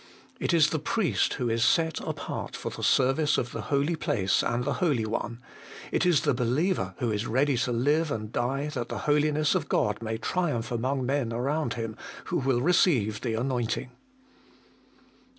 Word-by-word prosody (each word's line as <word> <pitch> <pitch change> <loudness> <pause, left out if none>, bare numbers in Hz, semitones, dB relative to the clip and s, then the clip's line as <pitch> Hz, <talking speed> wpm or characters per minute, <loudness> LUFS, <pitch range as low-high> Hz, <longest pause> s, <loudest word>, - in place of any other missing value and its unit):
It - - 0
is 160 -3 +4
the 160 - 0
priest 190 +5 0
who 125 -3 -2
is 115 0 +1
set 160 +4 +2
apart - - -5
for - - -5
the - - -8
service 140 +3 +3
of 120 - -2
the 115 - -4
holy 145 +4 +1
place 100 -10 +1
and 120 +1 -1
the 145 - -1
Holy 140 -11 +2
One, 115 +2 -4 0.5
it - - +2
is 175 -4 +4
the - - +2
believer 130 +10 0
who 120 -5 -1
is 105 +2 -2
ready 135 +4 +2
to 125 +1 0
live 145 +7 +2
and 110 -5 -4
die 135 +5 -1
that 125 -5 -4
the - - -4
Holiness 150 0 +2
of - - -1
God - - +1
may 110 0 -3
triumph 125 -3 -1
among 130 +3 -1
men 135 -3 0
around 130 +3 -1
him, 115 -2 -4 0.3
who - - -1
will 130 -2 +1
receive 130 - +2
the 115 -3 -1
anointing. 125 +1 -2
130 Hz, 180 wpm, -27 LUFS, 115-150 Hz, 0.5 s, is